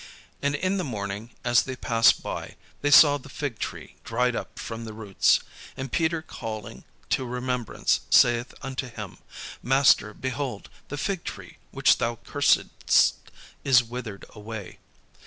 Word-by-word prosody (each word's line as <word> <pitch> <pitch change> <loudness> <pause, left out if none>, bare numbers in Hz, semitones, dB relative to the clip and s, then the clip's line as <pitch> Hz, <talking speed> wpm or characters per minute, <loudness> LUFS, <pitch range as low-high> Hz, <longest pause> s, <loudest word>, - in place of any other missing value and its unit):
And 140 0 +1
in 185 +6 0
the 185 - -1
morning, 105 -3 -5
as 120 -1 +4
they 130 - -5
passed 115 -2 +3
by, - - -5 0.3
they 145 - +1
saw 145 -1 +8
the 135 - -14
fig 135 -5 -4
tree - - -6
dried 125 +1 0
up - - -6
from 115 0 -6
the 110 -1 -7
roots. 105 -3 +2 0.4
And 135 -1 -5
Peter 160 0 0
calling 110 -8 -7 0.3
to - - +2
remembrance 125 -1 -1
saith 120 0 +4
unto 135 -1 -4
him, 105 -5 -8 0.4
"Master, 130 -5 +4
behold, 130 -4 -4 0.2
the 145 - -6
fig 190 +3 -2
tree - - -8
which - - +3
thou 120 0 0
cursedst - - +2 0.5
is 130 -2 +5
withered 115 -4 -7
away." 105 -3 -8
125 Hz, 145 wpm, -26 LUFS, 115-135 Hz, 0.5 s, saw